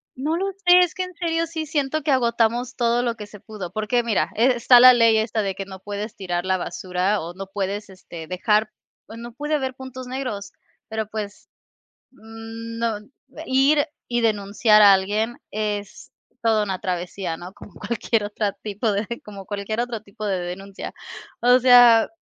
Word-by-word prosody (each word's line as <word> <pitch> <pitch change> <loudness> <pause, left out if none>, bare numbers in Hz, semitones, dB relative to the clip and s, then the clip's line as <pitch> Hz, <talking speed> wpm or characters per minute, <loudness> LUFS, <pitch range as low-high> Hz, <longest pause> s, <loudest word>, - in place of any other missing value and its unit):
No 295 +5 -1
lo 390 +3 -1
sé, 355 0 +8
es 360 -3 +3
que 370 - -3
en 365 0 -8
serio 330 -1 -1
sí 320 -1 -4
siento 305 -1 -1
que 295 - +1
agotamos 240 0 +1
todo 240 -1 +1
lo 235 -2 -1
que 210 -2 -9
se 205 0 -13
pudo, 200 -4 -8
porque, 215 +4 0
mira, 230 -3 0
eh, 245 +4 +4
está 240 +1 +6
la 255 0 +10
ley 230 -2 +4
esta 220 0 0
de 195 -2 -2
que 195 - -5
no 190 -1 -10
puedes 205 +3 -6
tirar 175 -4 -3
la 190 0 +1
basura 185 +3 -2
o 170 +2 -7
no 195 +1 -8
puedes, 200 +1 -4
este, 170 -4 -10
dejar, 210 +4 +1 0.4
pues, 225 - -11
no 240 +1 -8
puede 295 +5 -2
haber 265 -3 -2
puntos 260 -1 -9
negros, 250 -6 -5 0.4
pero, 220 -1 -3
pues, 210 -2 -7 0.6
no 225 -1 -5 0.5
ir 275 +3 +3 0.2
y 240 0 0
denunciar 210 0 +3
a 200 -1 +9
alguien 210 +5 0
es 205 -1 -4 0.3
toda 220 -2 +3
una 190 -2 -3
travesía, 180 -1 -3
¿no? 180 +2 -9
Como - - -14
cualquier 225 -1 -1
otra 205 0 -2
tipo 210 +2 -3
de 205 +2 -1 0.2
como 200 -2 -10
cualquier 205 +2 -3
otro 240 -2 -3
tipo 215 +1 -10
de 195 -2 0
denuncia. 190 +3 -7 0.5
O 245 +1 +5
sea, 245 -3 +7
220 Hz, 180 wpm, -23 LUFS, 200-245 Hz, 0.6 s, la